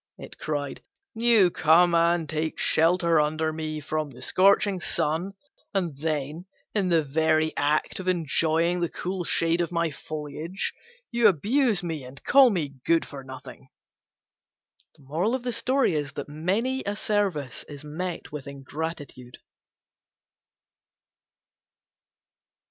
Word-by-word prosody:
it - - -11
cried: 145 -2 -3 0.3
"you 225 -5 +4
come 170 +3 +4
and 170 -1 +3
take 155 +1 -2
shelter 170 0 +3
under 155 +1 -1
me 155 -1 -4
from 155 0 -3
the 125 -2 -14
scorching 195 +6 +3
sun, 165 +2 -1 0.4
and 175 -7 -1
then, 155 +2 -3 0.3
in 195 -4 +1
the 165 -2 +3
very 155 +2 +1
act 150 +5 0
of 185 - -6
enjoying 165 0 +1
the 170 -1 0
cool 185 0 -4
shade 165 +1 +2
of 170 - -2
my 170 -2 0
foliage, 155 +5 -4 0.4
you 235 -2 +5
abuse 215 - +2
me 160 -5 -4
and 130 +2 -10
call 270 -1 +6
me 150 - -3
good 165 -1 +2
for 140 -2 -9
nothing!" 130 0 -11 1.3
Many 190 - -1
a 205 - -3
service 195 -11 -1
is 145 0 -8
met 170 +4 -5
with 150 -2 -7
ingratitude. 140 -2 -7
165 Hz, 115 wpm, -26 LUFS, 150-185 Hz, 1.3 s, call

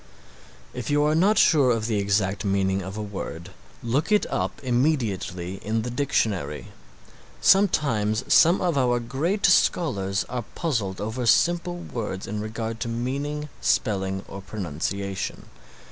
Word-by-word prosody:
If 125 -2 -5
you 145 0 +3
are 150 +1 +2
not 195 +7 +3
sure 145 -6 +5
of 115 -3 +1
the 110 -2 0
exact 100 0 0
meaning 95 -1 +1
of 95 +2 -7
a 105 - -3
word 95 -5 -6 0.3
look 130 - 0
it 210 - +4
up 95 +1 -2
immediately 115 - -1
in 110 +1 -1
the 125 - -4
dictionary. 110 - -1 0.7
Sometimes 120 - +3
some 170 +3 +5
of 170 -6 +1
our 120 -2 +2
great 140 - -1
scholars 100 - +2
are 125 -2 -4
puzzled 115 - -2
over 110 +4 -3
simple 175 +7 +3
words 110 - -5
in 105 +1 -4
regard 110 +1 -4
to 115 - -3
meaning, 140 +6 -3
spelling 95 -2 0
or 100 - -8
pronunciation. 95 +1 -4
115 Hz, 140 wpm, -25 LUFS, 100-145 Hz, 0.7 s, sure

